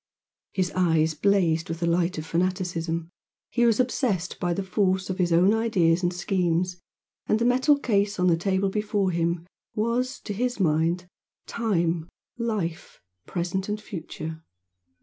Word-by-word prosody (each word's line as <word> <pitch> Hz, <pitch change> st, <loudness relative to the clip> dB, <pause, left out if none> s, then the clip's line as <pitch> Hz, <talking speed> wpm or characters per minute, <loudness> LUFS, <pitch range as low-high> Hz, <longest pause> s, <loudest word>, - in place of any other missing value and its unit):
His 185 Hz, -2 st, 0 dB
eyes 160 Hz, -3 st, +2 dB
blazed 165 Hz, -1 st, +2 dB
with 165 Hz, 0 st, -3 dB
the 170 Hz, -, 0 dB
light 170 Hz, +1 st, +1 dB
of 155 Hz, -, -4 dB
fanaticism 170 Hz, -1 st, -1 dB, 0.4 s
he 240 Hz, -1 st, +3 dB
was 230 Hz, 0 st, +3 dB
obsessed 235 Hz, -8 st, 0 dB
by 175 Hz, -, 0 dB
the 195 Hz, +3 st, -1 dB
force 190 Hz, -1 st, 0 dB
of 185 Hz, -, -5 dB
his 175 Hz, -1 st, +2 dB
own 180 Hz, +5 st, +5 dB
ideas 185 Hz, -7 st, +2 dB
and 175 Hz, -1 st, +1 dB
schemes, 180 Hz, 0 st, 0 dB, 0.5 s
and 215 Hz, -, +3 dB
the 230 Hz, -, 0 dB
metal 260 Hz, +4 st, +4 dB
case 205 Hz, -7 st, 0 dB
on 180 Hz, -, +3 dB
the 175 Hz, -2 st, +5 dB
table 190 Hz, +3 st, 0 dB
before 210 Hz, -2 st, 0 dB
him 170 Hz, 0 st, -1 dB, 0.3 s
was, 240 Hz, +4 st, 0 dB
to 205 Hz, -, -5 dB
his 245 Hz, +3 st, -1 dB
mind, 170 Hz, +1 st, +1 dB, 0.4 s
time, 175 Hz, -7 st, 0 dB, 0.3 s
life, 205 Hz, -8 st, -3 dB, 0.3 s
present 185 Hz, +3 st, -2 dB
and 210 Hz, +1 st, -1 dB
future. 160 Hz, -5 st, -7 dB
185 Hz, 150 wpm, -26 LUFS, 170-210 Hz, 0.5 s, own